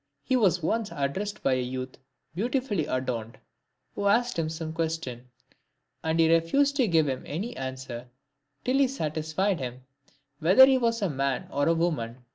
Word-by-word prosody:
He 260 - +1
was 185 -8 +3
once 220 +5 0
addressed 190 +9 -3
by 135 - +3
a 130 - +1
youth 130 +1 -5 0.4
beautifully 215 - -1
adorned, 125 -4 -3 0.6
who 200 - -1
asked 240 -1 +2
him 160 -1 0
some 160 0 -5
question; 160 -7 -3 0.7
and 160 +1 0
he 165 - +6
refused 275 +13 +3
to 255 -5 +3
give 160 -4 +3
him 130 -2 -2
any 205 +11 -4
answer, 130 -2 -6 0.6
till 260 +2 +2
he 275 - +5
satisfied 160 - -1
him 125 -1 -6 0.6
whether 185 +11 +8
he 265 -1 +3
was 230 -2 0
a 195 - +1
man 135 -1 -1
or 145 0 +1
a 165 - +4
woman. 130 -8 -2
160 Hz, 165 wpm, -27 LUFS, 130-205 Hz, 0.7 s, whether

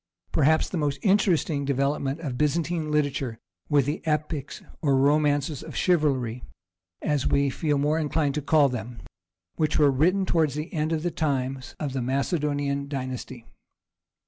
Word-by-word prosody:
Perhaps 155 +2 +3
the 180 - -2
most 145 -2 0
interesting 185 -7 +2
development 140 +2 -1
of 140 -6 -4
Byzantine 155 +3 0
literature 140 -5 -1 0.3
were 145 -2 +4
the 145 +5 -3
epics, 150 -2 -2 0.2
or 140 -4 +3
Romances 145 0 +2
of - - -9
Chivalry 135 -9 +1 0.6
as 145 -3 0
we 140 -1 +2
feel 150 0 0
more 150 +3 +1
inclined 150 -2 0
to 150 - -2
call 145 0 +4
them, 120 -2 -6 0.5
which 155 -1 +1
were 145 -2 +5
written 180 +8 +2
toward 165 -4 +2
the 150 +5 -5
end 155 -1 -1
of 160 -1 -1
the 175 - 0
times 135 -3 -2
of 145 -4 -3
the 135 - -1
Macedonian 140 +1 -1
dynasty. 130 -3 -5
145 Hz, 150 wpm, -26 LUFS, 135-155 Hz, 0.6 s, were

